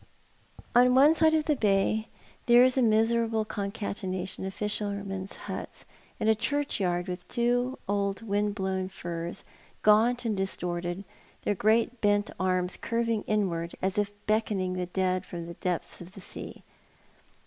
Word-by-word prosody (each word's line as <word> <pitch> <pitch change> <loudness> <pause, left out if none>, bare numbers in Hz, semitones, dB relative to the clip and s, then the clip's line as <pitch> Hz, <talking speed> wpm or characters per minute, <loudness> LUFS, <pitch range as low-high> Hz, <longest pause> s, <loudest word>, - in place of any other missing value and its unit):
On 250 +1 +6
one 285 +4 +7
side 320 0 +4
of 310 -1 +1
the 300 - +2
bay 215 0 +2 0.4
there 240 +1 +8
is 255 0 +4
a 265 - +3
miserable 225 0 +2
concatenation 195 -3 -4
of 190 - -3
fishermen's 200 -2 -3
huts, - - -7 0.3
and - - 0
a 220 - +6
churchyard 205 -8 -1
with 180 -1 -6
two 245 +2 0
old 200 +1 -1
wind 205 -1 0
blown 190 -1 -2
firs, 170 -2 -5 0.4
gaunt 230 +4 +4
and 220 -2 +1
distorted, 180 -1 -2 0.4
their - - +1
great 225 +4 +2
bent 205 0 +2
arras 185 -1 0
curving 230 -2 0
inward 175 -6 -1
as 190 +2 0
if 205 -1 0
beckoning 210 -4 0
the 180 -1 -2
dead 185 0 0
from 170 -1 -7
the 170 - -7
depths 180 0 -3
of 175 +2 -11
the 195 - -11
sea. - - -8
205 Hz, 150 wpm, -28 LUFS, 185-230 Hz, 0.4 s, there